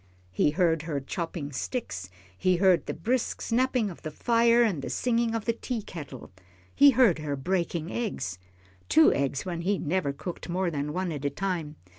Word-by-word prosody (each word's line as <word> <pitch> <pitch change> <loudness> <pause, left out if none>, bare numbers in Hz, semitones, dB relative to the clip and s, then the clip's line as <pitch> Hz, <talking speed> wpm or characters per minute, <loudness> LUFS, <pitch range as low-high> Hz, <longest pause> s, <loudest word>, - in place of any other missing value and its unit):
He 95 - +2
heard 165 0 +2
her 155 -3 -3
chopping 165 +1 -4
sticks, 125 - -4 0.3
he 185 - +2
heard 180 -3 +3
the - - -2
brisk 235 +9 -1
snapping 245 -3 +1
of 170 - -12
the 155 - -5
fire 235 +7 +3
and 195 -11 0
the - - -5
singing 235 -2 0
of 225 - -3
the 230 - +2
teakettle. 175 - -6 0.4
He 285 - +7
heard 240 -10 +4
her 150 -2 -2
breaking 170 +2 -2
eggs 190 - -3 0.5
two 155 -2 +6
eggs 140 +2 -1
when 170 -2 -3
he 195 +3 +1
never 170 -2 -1
cooked 170 +6 -7
more 180 0 0
than 145 -1 -2
one 180 +2 -2
at 145 -3 -5
a 145 - +1
time! 165 -2 -3
175 Hz, 180 wpm, -27 LUFS, 150-225 Hz, 0.5 s, He